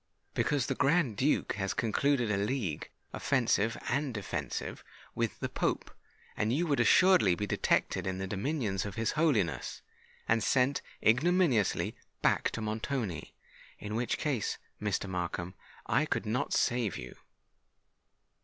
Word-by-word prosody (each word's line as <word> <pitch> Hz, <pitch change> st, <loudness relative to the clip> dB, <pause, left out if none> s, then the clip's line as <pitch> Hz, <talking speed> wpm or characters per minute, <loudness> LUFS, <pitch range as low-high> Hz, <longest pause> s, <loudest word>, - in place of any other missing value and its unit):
"Because 145 Hz, -4 st, +1 dB
the -, -, 0 dB
Grand 135 Hz, -3 st, +2 dB
Duke 135 Hz, +8 st, +1 dB
has 95 Hz, -1 st, -1 dB
concluded 120 Hz, +1 st, +1 dB
a 100 Hz, -, +1 dB
league, 100 Hz, -, -2 dB, 0.2 s
offensive 115 Hz, -4 st, +1 dB
and 140 Hz, +1 st, 0 dB
defensive, 105 Hz, -, -4 dB, 0.3 s
with -, -, -2 dB
the -, -, -1 dB
Pope; -, -, -2 dB, 0.4 s
and 110 Hz, -, 0 dB
you 155 Hz, +8 st, +1 dB
would 145 Hz, -5 st, +1 dB
assuredly 165 Hz, -, +5 dB
be 105 Hz, -, -2 dB
detected 100 Hz, -, +1 dB
in 95 Hz, 0 st, -2 dB
the 95 Hz, -, -3 dB
dominions 105 Hz, -, -1 dB
of 100 Hz, -2 st, -6 dB
his 110 Hz, -1 st, 0 dB
Holiness, 110 Hz, -, 0 dB, 0.4 s
and 110 Hz, -1 st, +2 dB
sent 130 Hz, +4 st, +2 dB, 0.2 s
ignominiously 135 Hz, -, +3 dB, 0.3 s
back -, -, +3 dB
to 115 Hz, -, -5 dB
Montoni—in 110 Hz, -, -5 dB
which 120 Hz, +1 st, 0 dB
case, 135 Hz, -9 st, -1 dB, 0.2 s
Mr. 105 Hz, -1 st, -1 dB
Markham, 90 Hz, -1 st, -3 dB, 0.3 s
I 140 Hz, +7 st, +2 dB
could -, -, -1 dB
not 110 Hz, +4 st, -1 dB
save 120 Hz, -4 st, +1 dB
you." 60 Hz, -, -8 dB
115 Hz, 135 wpm, -31 LUFS, 100-140 Hz, 0.4 s, assuredly